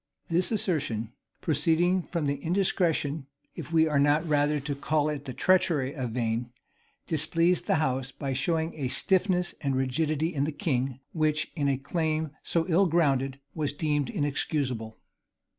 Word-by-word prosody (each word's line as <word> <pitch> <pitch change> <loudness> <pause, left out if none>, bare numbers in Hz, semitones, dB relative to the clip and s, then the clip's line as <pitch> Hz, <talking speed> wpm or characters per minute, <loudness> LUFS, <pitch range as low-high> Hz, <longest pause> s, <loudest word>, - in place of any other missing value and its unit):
This 175 +5 +1
assertion, 140 - -1 0.3
proceeding 165 +4 +2
from 170 -2 -3
the 140 0 0
indiscretion, 165 -5 +1 0.3
if - - -8
we 160 -1 +4
are 150 -2 +2
not 145 +3 +3
rather 150 0 +2
to 140 +1 -3
call 150 +2 0
it 145 -2 -4
the 130 - -5
treachery 170 -8 +2
of 130 -6 -3
Vane, 120 0 -1 0.5
displeased 165 +3 +1
the - - +3
house, 135 -4 0
by 135 0 -4
showing 160 +4 0
a 140 -4 -3
stiffness 180 +5 +1
and 140 -2 0
rigidity 155 +5 0
in 140 -1 0
the 155 - -2
king, 135 -3 -1
which, 155 -2 0
in 145 -2 0
a 135 -1 +2
claim 155 +1 -1
so 165 -1 0
ill 185 +2 +4
grounded, 140 -5 +1
was 150 -3 -2
deemed 145 -3 0
inexcusable. 135 -6 -1
150 Hz, 155 wpm, -28 LUFS, 135-165 Hz, 0.5 s, we